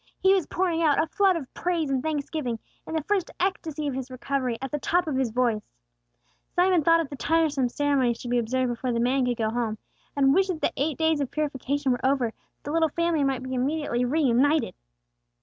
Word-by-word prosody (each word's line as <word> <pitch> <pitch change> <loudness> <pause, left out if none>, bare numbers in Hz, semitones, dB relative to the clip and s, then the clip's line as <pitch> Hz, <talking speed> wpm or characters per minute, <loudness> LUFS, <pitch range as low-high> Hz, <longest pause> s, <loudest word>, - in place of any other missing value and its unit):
He 380 0 +4
was 380 -5 +1
pouring 350 -2 0
out 305 -3 +3
a - - +3
flood 380 +3 +2
of 290 -6 -6
praise 335 -5 -1
and 265 -1 +1
thanksgiving, 290 -4 -2 0.3
in 320 - -4
the 315 - -1
first 390 0 0
ecstasy 330 -5 -2
of 285 - -1
his 260 0 -5
recovery, 255 -1 -2
at 270 - -5
the 295 - -2
top 350 +5 +1
of 305 -4 -2
his 260 -2 +1
voice. 230 -2 +1 1.0
Joel 360 -1 +4
thought 330 +2 +4
of 310 - -5
the - - -4
tiresome 295 -4 +1
ceremonies 265 -3 +1
to - - -6
be 245 0 +2
observed 250 +2 0
before 240 +1 -2
the 235 - 0
man 255 +2 +2
could 245 -1 -1
go 220 -2 0
home, 225 -2 -2 0.4
and 275 -1 +4
wished 385 +3 +3
that 340 -4 -3
the - - +1
eight 285 +1 -1
days 320 -2 +2
of 275 - -2
purification 285 -2 -1
were 245 - -2
over, 260 -3 +2
that - - -41
the 290 - -5
little 325 0 +2
family 335 -1 0
might 265 -2 0
be 260 0 -5
immediately 260 -1 0
reunited. 285 +2 +2
280 Hz, 220 wpm, -26 LUFS, 255-320 Hz, 1.0 s, He